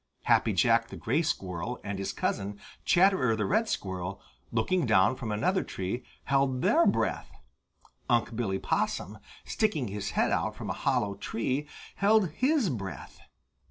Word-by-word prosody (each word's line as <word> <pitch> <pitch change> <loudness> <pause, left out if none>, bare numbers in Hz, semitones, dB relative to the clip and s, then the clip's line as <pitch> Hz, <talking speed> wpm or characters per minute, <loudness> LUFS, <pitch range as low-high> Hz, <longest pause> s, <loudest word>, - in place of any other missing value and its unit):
Happy - - +3
Jack 115 0 +3
the - - -9
Gray 135 +9 0
Squirrel 95 - -3
and 100 -1 -4
his 95 0 -2
cousin, 100 0 -2 0.3
Chatterer 175 - +4
the 105 - -1
Red 220 +4 +1
Squirrel, 95 0 -3 0.3
looking 130 +7 +1
down 105 +3 +4
from 120 -4 -5
another 185 - +1
tree, 95 +6 -4 0.2
held 135 -2 +1
their 335 +2 +4
breath. - - 0 0.8
Unc' 120 -1 +2
Billy 105 -5 -1
Possum, 105 +2 -2 0.3
sticking 160 - 0
his 100 0 -4
head - - +3
out - - 0
from - - -5
a - - -6
hollow 100 -1 +1
tree, 130 +8 -2 0.3
held 200 -3 +3
his 260 - +2
breath. 100 -6 -7
120 Hz, 150 wpm, -29 LUFS, 100-165 Hz, 0.8 s, Chatterer